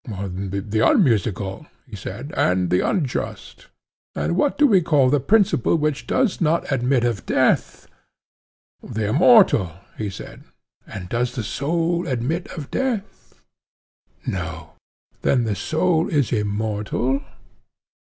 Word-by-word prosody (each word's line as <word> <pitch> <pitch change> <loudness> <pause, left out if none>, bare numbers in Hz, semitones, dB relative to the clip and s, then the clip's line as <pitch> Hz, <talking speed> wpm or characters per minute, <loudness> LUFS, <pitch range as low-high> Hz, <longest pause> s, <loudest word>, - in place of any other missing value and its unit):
The 100 +1 -3
unmusical, 105 - +1 0.2
he 115 -6 -10
said, 110 - -7
and 90 -1 +1
the 90 - +3
unjust. 145 -10 -3 0.5
And 75 +3 -1
what 190 - +1
do 295 - +5
we 200 -9 +5
call 145 -6 +3
the 145 - +3
principle 195 - +2
which 150 -6 -1
does 250 -9 0
not 165 -1 +1
admit 130 -1 +1
of 120 -4 -2
death? - - +1 0.9
The 110 -3 -3
immortal, 160 - +5 0.3
he 105 -2 -2
said. 95 - -10 0.5
And 90 -2 -7
does 120 +4 -2
the 120 - -3
soul 165 - -1
admit 135 +7 -2
of 145 -4 -7
death? 240 -6 -4 0.8
No. 80 -4 -5 0.5
Then 125 -3 +2
the 110 -2 -1
soul 160 - 0
is 140 -8 +1
immortal? 110 +5 -1
125 Hz, 125 wpm, -22 LUFS, 100-160 Hz, 0.9 s, do